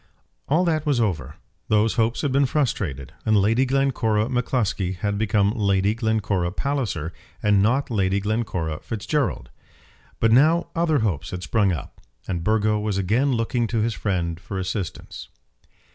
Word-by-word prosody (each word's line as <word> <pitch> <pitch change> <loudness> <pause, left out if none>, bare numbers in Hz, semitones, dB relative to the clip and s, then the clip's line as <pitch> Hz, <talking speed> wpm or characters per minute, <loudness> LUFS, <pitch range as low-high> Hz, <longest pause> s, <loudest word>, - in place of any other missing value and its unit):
All 165 +6 +2
that 155 -3 +1
was 145 -5 +1
over. 75 - -1 0.3
Those 110 +1 +3
hopes 115 0 +1
had 145 - +1
been 135 +1 +3
frustrated, 95 - -2
and 110 -1 +3
Lady 115 +6 +3
Glencora 125 -5 +1
M'Cluskie 115 -7 -1
had 100 +1 -1
become 105 -2 +2
Lady 100 -1 +1
Glencora 105 -6 0
Palliser 105 - -2 0.3
and 105 -2 +4
not 125 +6 +1
Lady 100 -2 +1
Glencora 100 -7 -2
Fitzgerald. 110 - -2 0.7
But 115 - +3
now 155 +8 +4
other 160 -5 +2
hopes 80 -8 -1
had 90 0 -6
sprung 100 +1 +2
up, 80 -7 -6 0.3
and 85 -3 -2
Burgo 110 0 +2
was 105 -2 -1
again 115 +9 +1
looking 115 0 0
to 115 -1 -1
his 115 +1 0
friend 85 -6 -2
for 95 +2 -6
assistance. 95 -1 -5
110 Hz, 150 wpm, -23 LUFS, 95-125 Hz, 0.7 s, and